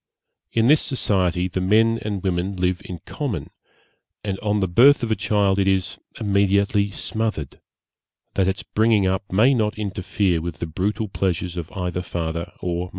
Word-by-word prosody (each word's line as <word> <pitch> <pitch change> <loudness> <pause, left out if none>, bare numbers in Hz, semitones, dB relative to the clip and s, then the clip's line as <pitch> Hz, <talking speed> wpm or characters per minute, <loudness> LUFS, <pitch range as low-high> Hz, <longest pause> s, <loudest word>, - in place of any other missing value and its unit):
In 115 -1 +2
this 150 +5 +5
society 90 -8 0
the 95 0 -3
men 110 +4 +3
and 100 -3 -4
women 95 +1 -1
live 90 0 0
in 90 -3 -8
common; 115 - -4 0.7
and 100 -2 -3
on 105 -1 0
the 95 - +1
birth 125 +10 +5
of 115 - -1
a - - +3
child 100 -2 +1
it 95 - +2
is 95 -2 0 0.2
immediately 100 0 +2
smothered, 105 - -3 0.7
that 95 -2 +1
its 95 +2 -1
bringing 110 -2 +2
up 95 +1 -1
may 115 +8 +5
not 110 -4 0
interfere 95 -3 -1
with 85 -1 -5
the - - -3
brutal 100 +7 -2
pleasures 90 -2 -2
of 85 -1 -6
either 90 -3 -2
father 85 -1 -4
or 85 -1 -1
mother. - - -11
95 Hz, 170 wpm, -22 LUFS, 90-105 Hz, 0.7 s, this